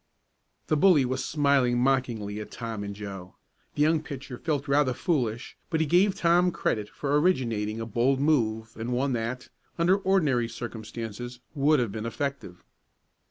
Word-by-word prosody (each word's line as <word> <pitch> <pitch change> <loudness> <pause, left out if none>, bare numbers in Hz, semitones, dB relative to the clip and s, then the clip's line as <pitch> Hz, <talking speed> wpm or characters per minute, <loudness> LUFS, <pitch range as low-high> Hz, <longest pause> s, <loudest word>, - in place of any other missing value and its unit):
The - - +1
bully 150 -3 +5
was 130 +1 -2
smiling 140 -5 +2
mockingly 120 -5 0
at 105 - -7
Tom 115 -3 -5
and 100 0 -6
Joe. 95 -3 -8 0.4
The 145 - +2
young 155 +1 +3
pitcher 135 -4 -8
felt 150 0 -2
rather 140 -2 +2
foolish, 120 -9 -1
but 160 - 0
he 160 - +2
gave 180 +6 +3
Tom 175 +1 +3
credit 105 -9 -1
for 145 +1 0
originating 115 - 0
a 115 - -3
bold 120 +5 +1
move 110 -7 +1
and 115 +2 -3
one 130 +2 0
that, 120 +2 -3 0.3
under 175 +3 +4
ordinary 155 - +1
circumstances, 115 +1 -7
would 150 0 +3
have 120 -5 -1
been 110 +2 -4
effective. 115 -8 -5
125 Hz, 160 wpm, -27 LUFS, 115-150 Hz, 0.4 s, bully